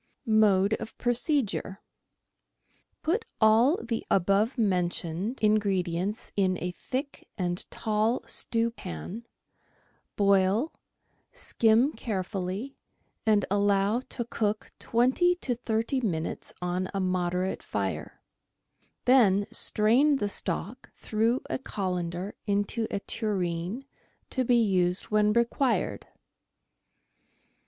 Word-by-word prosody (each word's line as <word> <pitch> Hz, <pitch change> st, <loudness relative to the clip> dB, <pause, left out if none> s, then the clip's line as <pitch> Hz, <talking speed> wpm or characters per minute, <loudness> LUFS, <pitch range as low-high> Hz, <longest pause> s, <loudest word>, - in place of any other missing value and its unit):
Mode 210 Hz, -2 st, +4 dB
of 220 Hz, -, -8 dB
Procedure. 240 Hz, -5 st, 0 dB, 0.6 s
— -, -, -44 dB
Put 390 Hz, +9 st, +1 dB, 0.2 s
all 230 Hz, -, +5 dB
the 230 Hz, -1 st, -3 dB
above 200 Hz, +7 st, +2 dB
mentioned 185 Hz, +1 st, 0 dB
in 215 Hz, 0 st, +5 dB
gredients 190 Hz, 0 st, -2 dB
in 185 Hz, -2 st, +2 dB
a 180 Hz, +1 st, -3 dB
thick 265 Hz, +9 st, -5 dB
and 175 Hz, -2 st, -2 dB
tall 220 Hz, +2 st, 0 dB
stewpan, 230 Hz, -, -3 dB, 0.9 s
boil, 200 Hz, +7 st, +3 dB, 0.6 s
skim 240 Hz, -, +3 dB
carefully, 195 Hz, +3 st, -4 dB, 0.5 s
and 210 Hz, -2 st, +4 dB
allow 200 Hz, +2 st, +2 dB
to 240 Hz, -, -3 dB
cook 215 Hz, -2 st, -2 dB
twenty 260 Hz, +10 st, +2 dB
to 270 Hz, -8 st, -2 dB
thirty 230 Hz, +2 st, -1 dB
minutes 165 Hz, -8 st, -3 dB
on 180 Hz, +1 st, -1 dB
a -, -, 0 dB
moderate 185 Hz, 0 st, -1 dB
fire; -, -, -4 dB, 0.8 s
then 205 Hz, -6 st, +5 dB
strain 245 Hz, +8 st, +4 dB
the 205 Hz, -6 st, -1 dB
stock 200 Hz, +4 st, -4 dB
through 225 Hz, +4 st, 0 dB
a -, -, -2 dB
colander 180 Hz, -4 st, -3 dB
into 205 Hz, +3 st, 0 dB
a -, -, -2 dB
tureen, 190 Hz, +2 st, -2 dB, 0.5 s
to 260 Hz, -, 0 dB
be 245 Hz, 0 st, +3 dB
used 185 Hz, -5 st, +2 dB
when 210 Hz, 0 st, +4 dB
required. 235 Hz, +4 st, 0 dB
210 Hz, 100 wpm, -28 LUFS, 185-235 Hz, 0.9 s, all